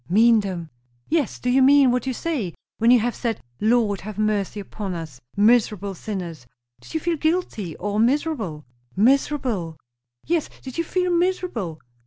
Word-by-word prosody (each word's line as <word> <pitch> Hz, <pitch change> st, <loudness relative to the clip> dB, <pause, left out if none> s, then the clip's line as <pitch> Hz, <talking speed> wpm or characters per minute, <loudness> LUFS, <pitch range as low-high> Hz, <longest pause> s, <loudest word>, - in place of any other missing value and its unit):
"Mean 225 Hz, +4 st, +5 dB
them!" 180 Hz, -6 st, -4 dB, 0.4 s
"Yes. 315 Hz, -7 st, 0 dB
Do -, -, -6 dB
you 265 Hz, +2 st, +4 dB
mean 275 Hz, -1 st, +6 dB
what 250 Hz, +2 st, -1 dB
you 260 Hz, -, 0 dB
say? 250 Hz, -, -2 dB, 0.2 s
When 230 Hz, +1 st, +4 dB
you 245 Hz, 0 st, +7 dB
have 240 Hz, +1 st, 0 dB
said, 230 Hz, -3 st, -2 dB, 0.2 s
'Lord, 215 Hz, -3 st, +2 dB
have 210 Hz, 0 st, -7 dB
mercy 215 Hz, -1 st, 0 dB
upon 200 Hz, -1 st, -5 dB
us, 155 Hz, -7 st, -8 dB, 0.2 s
miserable 210 Hz, -2 st, +3 dB
sinners' 175 Hz, -, -6 dB, 0.3 s
did -, -, -12 dB
you -, -, +2 dB
feel 335 Hz, +1 st, -1 dB
guilty? 305 Hz, -, -1 dB
or 205 Hz, +1 st, -2 dB
miserable?" 230 Hz, -, 0 dB, 0.3 s
"Miserable!" 235 Hz, -, +1 dB, 0.5 s
"Yes. 335 Hz, -2 st, 0 dB
Did 260 Hz, +3 st, -6 dB
you -, -, +2 dB
feel 360 Hz, +2 st, 0 dB
miserable?" 340 Hz, -, -1 dB
225 Hz, 160 wpm, -23 LUFS, 195-275 Hz, 0.5 s, you